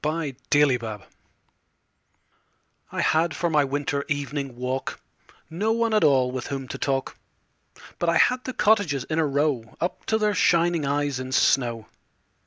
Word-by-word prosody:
Good 155 Hz, -3 st, -2 dB, 0.5 s
Hours 110 Hz, -3 st, -5 dB, 1.9 s
I -, -, -2 dB
HAD 160 Hz, 0 st, +2 dB
for 170 Hz, +2 st, -1 dB
my 150 Hz, -2 st, +4 dB
winter 140 Hz, +1 st, -2 dB
evening 145 Hz, -2 st, -3 dB
walk 125 Hz, +2 st, -4 dB, 0.5 s
No 200 Hz, +7 st, -1 dB
one 230 Hz, -1 st, 0 dB
at 215 Hz, -, +3 dB
all 130 Hz, -3 st, +3 dB
with 130 Hz, -1 st, -5 dB
whom 135 Hz, -2 st, -5 dB
to -, -, -6 dB
talk, 135 Hz, -1 st, -2 dB, 0.8 s
But 175 Hz, -, +1 dB
I 170 Hz, -, +3 dB
had 250 Hz, +6 st, +3 dB
the 255 Hz, -, -5 dB
cottages 200 Hz, -, +2 dB
in 155 Hz, +3 st, -2 dB
a 160 Hz, -, +2 dB
row 140 Hz, -5 st, -1 dB
Up 175 Hz, -, -3 dB
to 220 Hz, -, +2 dB
their 210 Hz, -1 st, +1 dB
shining 170 Hz, -4 st, +2 dB
eyes 145 Hz, -2 st, -1 dB
in 130 Hz, 0 st, -6 dB
snow. 120 Hz, -4 st, +2 dB
145 Hz, 155 wpm, -24 LUFS, 135-170 Hz, 1.9 s, my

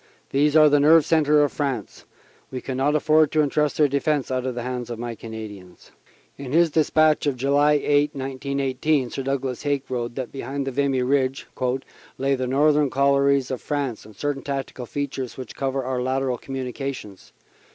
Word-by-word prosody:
These 145 Hz, +2 st, +2 dB
are 155 Hz, -1 st, +8 dB
the 145 Hz, 0 st, +4 dB
nerve 155 Hz, +2 st, +6 dB
centre 150 Hz, -2 st, +4 dB
of 145 Hz, -, 0 dB
France. 135 Hz, -8 st, -4 dB, 0.4 s
We 130 Hz, -, -5 dB
can 130 Hz, +1 st, -5 dB
not 145 Hz, +3 st, +2 dB
afford 155 Hz, 0 st, +3 dB
to 155 Hz, -1 st, +4 dB
entrust 150 Hz, 0 st, 0 dB
their 150 Hz, -, +5 dB
defense 140 Hz, 0 st, 0 dB
out 130 Hz, 0 st, -1 dB
of 125 Hz, -, -3 dB
the 120 Hz, -, -4 dB
hands 125 Hz, -1 st, -4 dB
of 120 Hz, -, -5 dB
my 120 Hz, 0 st, -4 dB
Cana 110 Hz, -1 st, -7 dB
dians." 95 Hz, -4 st, -14 dB, 0.5 s
In 135 Hz, -1 st, -6 dB
his 165 Hz, 0 st, +4 dB
despatch 155 Hz, 0 st, +3 dB
of 140 Hz, -, +1 dB
July 140 Hz, +3 st, +3 dB
8, 145 Hz, 0 st, +2 dB
1918, 135 Hz, 0 st, -1 dB
Sir -, -, -4 dB
Douglas 135 Hz, -2 st, -2 dB
Haig 145 Hz, -2 st, -1 dB
wrote 120 Hz, -2 st, -3 dB
that 130 Hz, -3 st, -5 dB
behind 135 Hz, +1 st, -4 dB
Vimy 135 Hz, -1 st, 0 dB
Ridge 135 Hz, +1 st, 0 dB, 0.7 s
"lay 135 Hz, +1 st, +1 dB
the 130 Hz, -1 st, -1 dB
northern 145 Hz, +2 st, +3 dB
collieries 140 Hz, 0 st, +2 dB
of 130 Hz, -, -4 dB
France 140 Hz, -7 st, -3 dB
and 110 Hz, -1 st, -15 dB
certain 145 Hz, +4 st, -2 dB
tactical 135 Hz, -3 st, -5 dB
features 135 Hz, -2 st, -4 dB
which 130 Hz, -4 st, -8 dB
cover 135 Hz, 0 st, -2 dB
our 125 Hz, 0 st, -2 dB
lateral 130 Hz, -1 st, -1 dB
communi 130 Hz, -2 st, -5 dB
cations. 130 Hz, -9 st, -7 dB
135 Hz, 185 wpm, -23 LUFS, 130-145 Hz, 0.7 s, are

